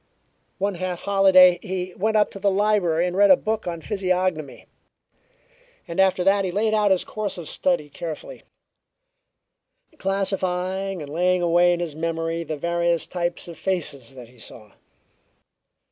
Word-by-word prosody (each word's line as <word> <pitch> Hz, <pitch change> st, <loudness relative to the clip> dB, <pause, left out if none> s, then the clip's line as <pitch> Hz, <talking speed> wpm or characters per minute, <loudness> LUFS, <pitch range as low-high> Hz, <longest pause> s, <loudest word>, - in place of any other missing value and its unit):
One 200 Hz, +1 st, -1 dB
half 180 Hz, -1 st, -4 dB
holiday 190 Hz, -3 st, +5 dB
he 185 Hz, -1 st, -4 dB
went 215 Hz, +4 st, 0 dB
up 210 Hz, -, +2 dB
to 195 Hz, -, -9 dB
the 200 Hz, +1 st, +2 dB
library 190 Hz, -4 st, +1 dB
and 180 Hz, 0 st, -3 dB
read 200 Hz, +1 st, +5 dB
a 280 Hz, -, +8 dB
book 220 Hz, -5 st, -3 dB
on 170 Hz, -1 st, -4 dB
physiognomy, 185 Hz, -6 st, -2 dB, 1.2 s
and 170 Hz, +2 st, -5 dB
after 190 Hz, -1 st, +3 dB
that 195 Hz, +1 st, +3 dB
he 190 Hz, -, -1 dB
laid 215 Hz, +4 st, 0 dB
out 210 Hz, -1 st, +3 dB
his 190 Hz, -2 st, +2 dB
course 210 Hz, -3 st, -5 dB
of 170 Hz, -3 st, -7 dB
study 175 Hz, -5 st, 0 dB
carefully, 160 Hz, -, -8 dB, 1.6 s
classifying 190 Hz, -1 st, -2 dB
and 145 Hz, 0 st, -9 dB
laying 180 Hz, +2 st, +1 dB
away 175 Hz, +1 st, +4 dB
in 175 Hz, -, 0 dB
his 165 Hz, -4 st, -4 dB
memory 165 Hz, +1 st, -2 dB
the 155 Hz, -2 st, -5 dB
various 170 Hz, +1 st, 0 dB
types 175 Hz, -1 st, -3 dB
of 170 Hz, -, -10 dB
faces 140 Hz, -9 st, -3 dB
that 125 Hz, -2 st, -11 dB
he 125 Hz, -1 st, -21 dB
saw. 110 Hz, -1 st, -12 dB
180 Hz, 155 wpm, -23 LUFS, 170-195 Hz, 1.6 s, a